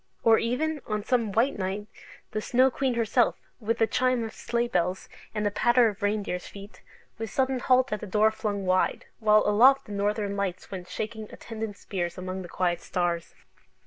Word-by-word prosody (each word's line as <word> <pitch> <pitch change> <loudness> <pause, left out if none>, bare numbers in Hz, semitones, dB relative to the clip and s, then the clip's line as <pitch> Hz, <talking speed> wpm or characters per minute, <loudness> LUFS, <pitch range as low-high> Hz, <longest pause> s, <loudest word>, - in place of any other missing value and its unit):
Or 225 -1 +6
even, 295 +6 -1
on 210 -1 -2
some 230 -3 +1
white 230 +4 +1
night, 195 +2 -2 0.5
the 215 - -2
Snow 255 +4 +3
Queen 260 -1 -1
herself, 235 +1 +2 0.2
with 230 0 -1
a - - +7
chime 255 0 +1
of 225 - -6
sleigh 235 0 -1
bells 180 -3 -1 0.3
and 210 0 -1
the 205 - +1
patter 240 +2 +4
of 205 0 -9
reindeers' 205 -3 -1
feet, 200 +1 -12 0.4
with 225 -1 -4
sudden 260 +3 0
halt 255 -1 +3
at 210 - -2
the 210 - -6
door 215 +3 +3
flung 205 -3 -3
wide, 185 0 +1
while 215 -1 +5
aloft 245 +7 +5
the - - -11
Northern 205 0 -1
Lights 195 -3 -3
went 185 -2 -7
shaking 220 -1 -5
attendant 220 -3 -6
spears 175 -2 -4
among 185 +1 -5
the 175 - -9
quiet 175 -1 0
stars! 175 -2 -2
215 Hz, 185 wpm, -27 LUFS, 195-235 Hz, 0.5 s, a